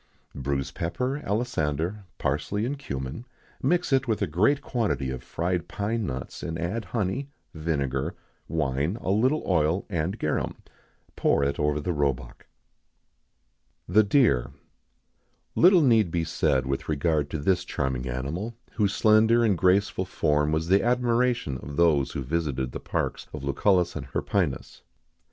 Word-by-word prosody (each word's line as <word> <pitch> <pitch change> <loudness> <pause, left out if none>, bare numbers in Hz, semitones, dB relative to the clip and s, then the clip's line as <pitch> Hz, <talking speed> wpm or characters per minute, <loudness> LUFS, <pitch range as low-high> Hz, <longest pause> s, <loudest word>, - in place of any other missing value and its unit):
_ 70 - -6
Bruise 70 0 -2
pepper, 125 - -2
alisander, 100 - -1
parsley, 100 +10 -1
and 140 +3 -3
cummin; 65 - -5 0.4
mix 175 +5 +1
with 130 -5 +2
it - - -16
a - - +3
great 105 - +2
quantity 90 - -1
of 65 -1 -5
fried 85 +5 -2
pine 105 +1 -2
nuts; 65 -1 -5
and 80 - -4
add 90 +8 -3
honey, 120 +6 -2 0.2
vinegar, 70 -5 -2 0.3
wine, 75 - -1
a 95 - -1
little 130 +9 +2
oil, 85 +1 +1
and 85 +4 -1
garum. 75 - -1 0.6
Pour 70 - +2
it 70 0 -1
over 75 0 +1
the 85 +4 -2
roebuck.[XIX 70 -5 -2 1.4
62] 90 - -9
THE 110 +2 +7
DEER. 100 - +3 1.0
Little 180 -1 +6
need 115 -8 +4
be 85 0 0
said 70 -4 +1
with 70 +3 -3
regard 75 -1 +1
to 80 - -3
this 90 +4 +1
charming 65 -1 -2
animal, 80 - -4 0.2
whose 100 -3 0
slender 110 +4 +5
and 105 -4 +3
graceful 95 +2 +2
form 75 -4 +1
was 80 +1 0
the 95 +2 +4
admiration 120 - +1
of 70 0 -8
those 75 -5 +3
who 70 - -3
visited 65 -3 -2
the - - -5
parks - - -3
of 75 -3 -6
Lucullus 90 +5 +2
and 70 -4 -5
Hirpinus. 80 +2 -2
85 Hz, 150 wpm, -26 LUFS, 70-110 Hz, 1.4 s, THE